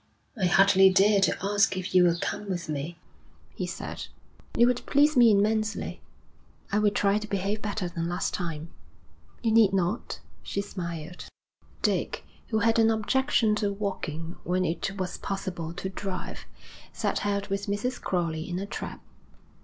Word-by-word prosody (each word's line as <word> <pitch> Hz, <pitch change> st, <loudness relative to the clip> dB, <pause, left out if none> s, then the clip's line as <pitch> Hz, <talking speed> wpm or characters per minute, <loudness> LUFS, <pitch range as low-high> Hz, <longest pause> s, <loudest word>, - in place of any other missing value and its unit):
'I 190 Hz, -6 st, +1 dB
hardly 195 Hz, +1 st, +6 dB
dare 200 Hz, +2 st, +4 dB
to -, -, +2 dB
ask 200 Hz, -1 st, +2 dB
if 185 Hz, +1 st, -4 dB
you 180 Hz, -1 st, +7 dB
will 170 Hz, -1 st, +3 dB
come 205 Hz, +3 st, -3 dB
with 175 Hz, -2 st, -3 dB
me,' 155 Hz, +3 st, -4 dB, 0.6 s
he -, -, -3 dB
said. -, -, -6 dB, 0.5 s
'It 235 Hz, -, +7 dB
would 245 Hz, 0 st, +2 dB
please 295 Hz, +2 st, +4 dB
me 240 Hz, -2 st, +7 dB
immensely.' 215 Hz, +1 st, +1 dB, 0.7 s
'I 205 Hz, -, +2 dB
will 210 Hz, -1 st, +4 dB
try 205 Hz, 0 st, +2 dB
to 215 Hz, -, -7 dB
behave 200 Hz, +1 st, -1 dB
better 205 Hz, -3 st, -2 dB
than 170 Hz, -1 st, -3 dB
last 175 Hz, +1 st, -1 dB
time.' 165 Hz, -2 st, -4 dB, 0.7 s
'You 225 Hz, -, +2 dB
need 220 Hz, -3 st, +5 dB
not,' 190 Hz, +4 st, -1 dB, 0.2 s
she -, -, -4 dB
smiled. 175 Hz, -4 st, -5 dB, 0.6 s
Dick, -, -, 0 dB, 0.2 s
who 220 Hz, -, 0 dB
had 230 Hz, +1 st, +3 dB
an 225 Hz, 0 st, +5 dB
objection 225 Hz, +1 st, +2 dB
to 205 Hz, -1 st, 0 dB
walking 180 Hz, -5 st, -4 dB
when 185 Hz, +1 st, 0 dB
it 195 Hz, +4 st, -2 dB
was 185 Hz, -2 st, -3 dB
possible 180 Hz, -4 st, -4 dB
to 185 Hz, +2 st, -4 dB
drive, 190 Hz, -1 st, -6 dB, 0.4 s
set -, -, -1 dB
out 200 Hz, 0 st, -1 dB
with 200 Hz, +1 st, -2 dB
Mrs. 205 Hz, +6 st, -2 dB
Crowley 165 Hz, -3 st, -1 dB
in 175 Hz, -, -2 dB
a 195 Hz, -, -3 dB
trap. -, -, -6 dB
195 Hz, 160 wpm, -27 LUFS, 180-210 Hz, 0.7 s, you